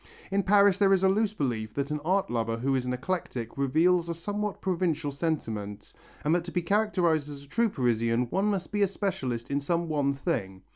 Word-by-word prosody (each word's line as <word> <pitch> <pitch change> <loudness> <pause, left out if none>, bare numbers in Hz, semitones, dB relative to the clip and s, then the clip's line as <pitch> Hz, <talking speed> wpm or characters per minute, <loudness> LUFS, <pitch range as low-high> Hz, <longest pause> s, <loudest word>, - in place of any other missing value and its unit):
In 200 +1 +2
Paris 200 0 +4
there 195 -1 +5
is 190 -1 +2
a - - +6
loose 210 +2 +1
belief 110 - -2
that 140 +1 -2
an 150 - -1
art 190 0 +1
lover 115 -1 -1
who 135 +4 0
is 130 -1 0
an 125 - 0
eclectic 125 -5 -3
reveals 165 +6 +2
a 170 - -2
somewhat 205 +4 -3
provincial 165 -5 -1
sentiment, 115 -10 -3 0.3
and 150 - +2
that 175 -1 +2
to 175 - -6
be 180 -1 -1
characterized 175 -6 +1
as 140 -1 -9
a - - -17
true 230 +10 +1
Parisian 115 - +1
one 195 +2 +1
must 200 -3 -1
be 205 -1 0
a 200 - +5
specialist 140 - -3
in 140 - +1
some 170 +4 -1
one 140 -2 +1
thing. 95 - -3
160 Hz, 210 wpm, -28 LUFS, 130-190 Hz, 0.3 s, a